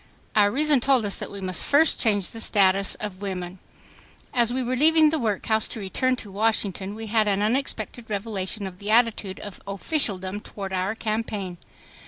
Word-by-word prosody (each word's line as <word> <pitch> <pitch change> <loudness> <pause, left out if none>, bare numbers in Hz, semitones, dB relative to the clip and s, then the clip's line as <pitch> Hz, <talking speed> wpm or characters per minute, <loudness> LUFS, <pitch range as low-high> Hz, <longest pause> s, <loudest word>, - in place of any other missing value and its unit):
Our 205 -1 +5
reason 290 +4 +2
told 255 -2 +3
us 200 - -2
that - - -4
we 200 - -8
must 185 -2 -2
first 300 +2 +3
change 205 -5 +2
the 225 - -6
status 195 -2 +2
of 205 -3 -7
women. 185 -2 -5 0.7
As 240 -2 +3
we 260 +1 -1
were 250 +1 -1
leaving 310 +2 +5
the 315 - 0
workhouse 220 -1 +1
to - - -4
return 255 +6 0
to 215 -5 -7
Washington 200 -2 0
we 225 +1 -6
had 220 0 +2
an 200 0 +1
unexpected 230 -1 -2
revelation 200 -1 -2
of 185 -1 -8
the 205 - -6
attitude 220 -4 +2
of 205 -3 -9
officialdom 200 - 0
toward 195 -2 -7
our 190 +3 -1
campaign. 215 -5 -3
210 Hz, 180 wpm, -24 LUFS, 195-235 Hz, 0.7 s, Our